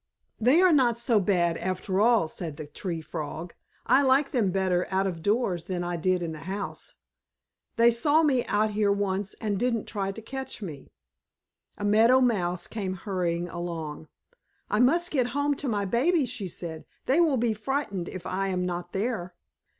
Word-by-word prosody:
"They 255 +10 +5
are 370 - +6
not 250 -6 +3
so 235 -2 +2
bad 175 -4 +1
after 185 +1 -1
all," 225 -6 +4
said 155 -3 -6
the 155 - -6
Tree 165 +2 -5
Frog. 160 +1 -6 0.3
"I 275 - +5
like 275 +1 +3
them 225 -7 +2
better 185 -1 +1
out 190 0 +1
of 175 -4 -3
doors 200 -4 0
than 180 -2 -3
I 175 0 -2
did 180 +1 0
in 165 - -3
the 155 - -7
house. 200 +1 -5 0.8
They 235 +1 +6
saw 290 +7 +3
me 265 -5 +3
out 215 +1 +1
here 205 -1 +2
once 200 0 -1
and 205 -3 -1
didn't 235 -2 0
try 195 -1 -2
to 195 - -8
catch 265 +4 -6
me." 160 -10 -8 0.9
A 205 - -4
Meadow 225 +5 +5
Mouse 180 -8 +1
came 195 -4 -4
hurrying 175 -3 -2
along. 165 -3 -5 0.6
"I 210 - +2
must 335 +8 +3
get 255 -5 +1
home 285 0 +2
to 285 - -4
my 205 -4 0
babies," 265 - +2
she 230 -6 -4
said. 165 -2 -7 0.2
"They 270 +6 +3
will 315 -6 +4
be 230 -1 +1
frightened 210 -5 -3
if 185 -1 -8
I 195 +1 -1
am 180 -1 -1
not 175 0 -4
there." 195 -4 -2
200 Hz, 180 wpm, -27 LUFS, 175-240 Hz, 0.9 s, are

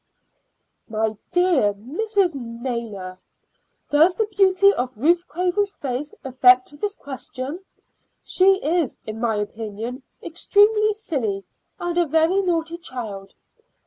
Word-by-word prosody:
"My 220 0 -1
dear 345 - +3
Mrs. 365 - 0
Naylor, 230 -7 -5 0.7
does 320 +5 +5
the 440 - +1
beauty 395 -1 +4
of 250 - -3
Ruth 340 +8 +2
Craven's 365 +5 -1
face 275 +2 -4
affect 255 +1 +4
this 410 -1 -1
question? 270 +2 -6 0.6
She 385 +1 +4
is, 325 -3 0
in 215 0 -6
my 230 -2 0
opinion, 220 +4 -5 0.2
extremely 420 +5 +3
silly, 245 - -3 0.4
and 350 -1 -2
a 345 - +2
very 325 +6 +3
naughty 335 -2 -1
child. 215 - -7
290 Hz, 115 wpm, -22 LUFS, 230-360 Hz, 0.7 s, does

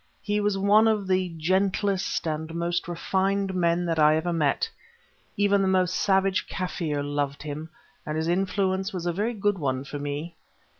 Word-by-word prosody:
He 205 0 0
was 205 -1 +1
one 205 +3 +5
of 215 -3 +1
the 185 -1 +1
gentlest 190 +3 0
and 160 +1 -3
most 170 0 -1
refined 190 +3 0
men 175 -1 +1
that 165 -2 0
I 155 0 +6
ever 170 +2 -1
met; 160 - +1 0.7
even 200 -1 +3
the 195 - +2
most 185 -1 +2
savage 195 0 +2
Kaffir 165 -5 -2
loved 145 0 -2
him, 155 +2 -6 0.3
and 150 +1 -3
his 160 +1 -1
influence 190 +2 0
was 175 -2 -4
a 175 - 0
very 215 +6 -1
good 205 -2 0
one 130 -3 -1
for 145 +1 -6
me. 145 +4 -4
180 Hz, 170 wpm, -26 LUFS, 160-195 Hz, 0.7 s, I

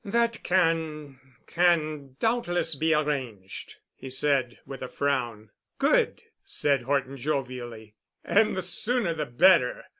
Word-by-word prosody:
"That 235 +2 0
can—can 155 -2 -1
doubtless 225 -8 0
be 160 +3 0
arranged," 130 -11 -2 0.2
he 135 - -10
said 130 -2 +1
with 135 -1 -9
a 130 - -4
frown. 120 -7 -2 0.3
"Good," - - +2 0.2
said 140 -2 0
Horton 135 +1 -1
jovially. 125 -5 -4 0.3
"And 215 -1 +3
the 185 - -1
sooner 210 +1 0
the 155 -3 -3
better. 125 +2 +4
145 Hz, 115 wpm, -27 LUFS, 130-175 Hz, 0.3 s, better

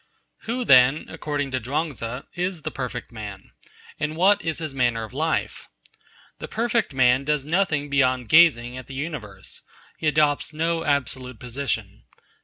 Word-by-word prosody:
Who, 240 +2 -2
then, 130 - +6
according 145 -3 -3
to 130 - -1
Chuang 150 +7 -2
Tzu, 120 +2 -6
is 180 -2 -3
the - - -3
perfect 125 -2 -5
man? 105 -4 -9 0.5
And 150 +1 -2
what 195 +5 +4
is 160 -1 -2
his 155 -4 -4
manner 120 -4 +1
of 110 - -9
life? 160 +4 -2 0.7
The - - -6
perfect 235 -2 0
man 130 0 +3
does 150 -1 0
nothing 160 -3 +1
beyond 130 -3 +1
gazing 130 -7 +5
at 130 - -11
the 135 - -9
universe. 130 - -6 0.4
He 160 - -1
adopts 150 0 +2
no 165 +1 0
absolute 130 -4 -1
position. 125 +1 -4
140 Hz, 155 wpm, -24 LUFS, 125-160 Hz, 0.7 s, then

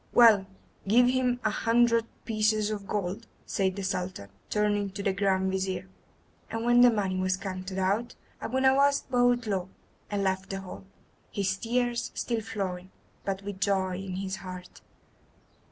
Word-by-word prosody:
"Well, 220 -5 +7 0.4
give 240 +5 +6
him 250 -1 +1
a 215 - +2
hundred 230 0 +3 0.2
pieces 215 -1 +1
of 200 -2 -5
gold," 205 +3 -3 0.2
said 190 -3 0
the 200 - -4
Sultan, 180 - -3 0.2
turning 205 -1 +1
to 200 0 -5
the 195 - +1
Grand 190 -1 +1
Vizir. 190 -1 -2 0.6
And 225 +1 -3
when 240 0 +6
the 245 - +9
money 200 -5 0
was 185 0 +1
counted 185 0 -5
out 200 +6 0 0.3
Abu 260 +2 -1
Nowas 275 +2 +4
bowed 245 -2 +2
low, 190 -3 -2 0.4
and 205 -1 -1
left 190 0 -1
the 195 0 -4
hall, 190 0 -9 0.5
his 195 -2 0
tears 240 +2 -1
still 235 -2 -1
flowing, 190 -4 -4 0.4
but 195 0 -2
with 200 -1 -6
joy 190 -2 +1
in 190 -1 -5
his 190 0 -3
heart. 185 -1 -9
200 Hz, 155 wpm, -28 LUFS, 190-230 Hz, 0.6 s, the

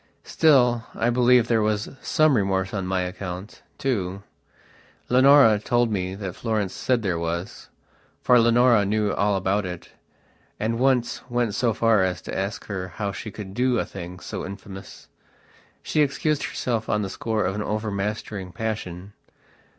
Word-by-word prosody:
Still, 125 -7 +3
I 120 +2 +1
believe 125 -1 +4
there 115 -2 +2
was 105 0 0
some 155 -3 +3
remorse 95 -3 0
on 95 -3 -2
my 95 0 0
account, 90 +2 -6 0.2
too. 100 -7 -2 0.9
Leonora 130 -4 +6
told 120 +1 +1
me 95 -2 -2
that 95 -3 -5
Florence 110 -5 -2
said 125 -3 0
there 90 -4 -1
wasfor 85 +7 -2
Leonora 120 -1 +4
knew 105 +1 0
all 100 0 +1
about 95 +2 0
it, 90 -2 -7 0.7
and 115 +2 -1
once 130 -2 +1
went 120 -3 0
so 120 +1 +1
far 110 -1 +3
as 90 -1 0
to - - -6
ask 100 +2 -3
her 95 -3 -4
how 100 -2 -2
she 100 +4 -7
could 100 -2 -8
do 125 +2 +1
a - - 0
thing 90 -1 -8
so - - -6
infamous. 95 0 -10 0.8
She 155 - +1
excused 150 +1 0
herself 115 -3 -2
on 105 0 +1
the - - -2
score 110 -2 -1
of 95 - -1
an 105 - -3
overmastering 105 -2 -3
passion. 105 -4 -5
105 Hz, 155 wpm, -24 LUFS, 95-120 Hz, 0.9 s, Leonora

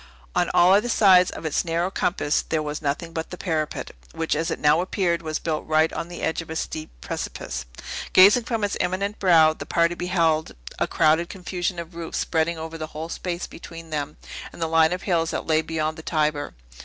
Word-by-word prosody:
On - - +2
all 180 +2 +6
other 210 +5 +3
sides 185 -5 +6
of - - -8
its 155 - 0
narrow 170 +2 -1
compass 170 -5 0
there 160 -1 -2
was 150 0 -4
nothing 155 +3 -2
but 160 0 -4
the 180 - -7
parapet, 155 -5 -2 0.2
which 165 -1 -1
as 160 +2 -1
it - - -2
now 150 +3 +4
appeared 180 -2 0
was 155 -1 -2
built 155 -2 -2
right 155 +1 +3
on 165 - -4
the 175 0 -8
edge 160 - 0
of 165 - -12
a 160 - -5
steep 155 -1 -4
precipice. - - -5 0.4
Gazing 205 +6 +7
from 230 -3 -2
its 205 - 0
imminent 200 +3 -1
brow, 165 -4 +6
the - - -9
party 170 0 +2
beheld 170 -3 0 0.2
a - - +1
crowded 160 +3 +2
confusion 180 -1 -3
of 170 0 -7
roofs 165 -1 -5
spreading 165 0 0
over 160 +1 -7
the 155 - -4
whole 160 +1 -5
space 175 0 -4
between 165 -1 -11
them 150 0 -3 0.3
and - - -13
the 165 - 0
line 160 0 +4
of 180 +1 -3
hills 165 -4 +1
that - - -3
lay 160 -1 +3
beyond 160 0 -2
the - - -7
Tiber. 150 - -1
165 Hz, 210 wpm, -24 LUFS, 155-180 Hz, 0.4 s, Gazing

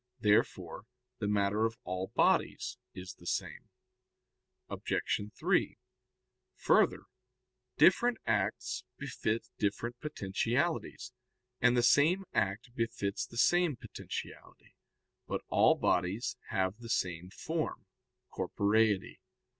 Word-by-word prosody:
Therefore 105 -2 +1 0.3
the 105 - -1
matter 105 +1 +1
of 115 +1 -9
all 95 +1 -3
bodies - - +2 0.2
is 90 0 -7
the 85 - -12
same. - - -3 1.0
Obj. - - -4 0.4
3: - - +1 0.8
Further, - - +3 0.7
different 245 0 +5
acts 105 -4 -1
befit 110 +2 -2
different 115 +4 -2
potentialities, 125 - -2 0.5
and 125 0 +4
the 120 - +3
same 165 +10 +4
act 100 +5 -1
befits 115 -4 -2
the 115 - -11
same 175 +3 +3
potentiality. - - -8 0.5
But - - -2
all - - +5
bodies 95 +9 0
have 95 +3 -1
the 115 -1 -9
same 90 -4 -1
form, 160 - -4 0.5
corporeity. 105 -1 +1
110 Hz, 100 wpm, -32 LUFS, 95-120 Hz, 1.0 s, different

